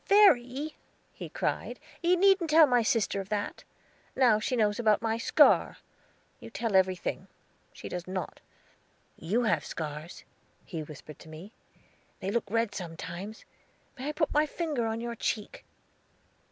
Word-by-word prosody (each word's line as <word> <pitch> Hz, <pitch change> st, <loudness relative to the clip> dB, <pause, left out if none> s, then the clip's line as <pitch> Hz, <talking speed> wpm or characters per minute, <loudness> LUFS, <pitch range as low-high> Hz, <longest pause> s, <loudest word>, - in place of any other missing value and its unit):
"Verry," 300 Hz, -8 st, +4 dB, 0.4 s
he -, -, -8 dB
cried, -, -, -3 dB, 0.2 s
"you 350 Hz, +1 st, +3 dB
needn't 385 Hz, -2 st, +4 dB
tell 315 Hz, +1 st, +8 dB
my 245 Hz, -3 st, +3 dB
sister 215 Hz, -3 st, +1 dB
of 195 Hz, -, -11 dB
that; 205 Hz, -1 st, -3 dB, 0.5 s
now 240 Hz, -5 st, +4 dB
she 235 Hz, +4 st, -1 dB
knows 210 Hz, -2 st, +1 dB
about 215 Hz, -3 st, +3 dB
my 225 Hz, 0 st, +1 dB
scar. -, -, +4 dB, 0.6 s
You -, -, -10 dB
tell 230 Hz, -4 st, -2 dB
everything; 185 Hz, -1 st, +1 dB, 0.4 s
she -, -, -9 dB
does 180 Hz, 0 st, -5 dB
not. 185 Hz, 0 st, -5 dB, 0.8 s
You 210 Hz, +9 st, -1 dB
have 215 Hz, -, +1 dB
scars," 155 Hz, +1 st, -6 dB, 0.4 s
he 165 Hz, -, -5 dB
whispered 150 Hz, 0 st, -11 dB
to 160 Hz, -, -13 dB
me; 165 Hz, +8 st, -11 dB, 0.7 s
"they 195 Hz, -, -3 dB
look 220 Hz, -2 st, -1 dB
red 230 Hz, 0 st, 0 dB
sometimes. 180 Hz, +3 st, -7 dB, 0.5 s
May 265 Hz, +1 st, -6 dB
I -, -, 0 dB
put 305 Hz, 0 st, -1 dB
my 300 Hz, +1 st, +3 dB
finger 295 Hz, -7 st, -2 dB
on 225 Hz, +1 st, -3 dB
your 235 Hz, 0 st, -4 dB
cheek?" 215 Hz, -2 st, -3 dB
225 Hz, 150 wpm, -29 LUFS, 190-265 Hz, 0.8 s, tell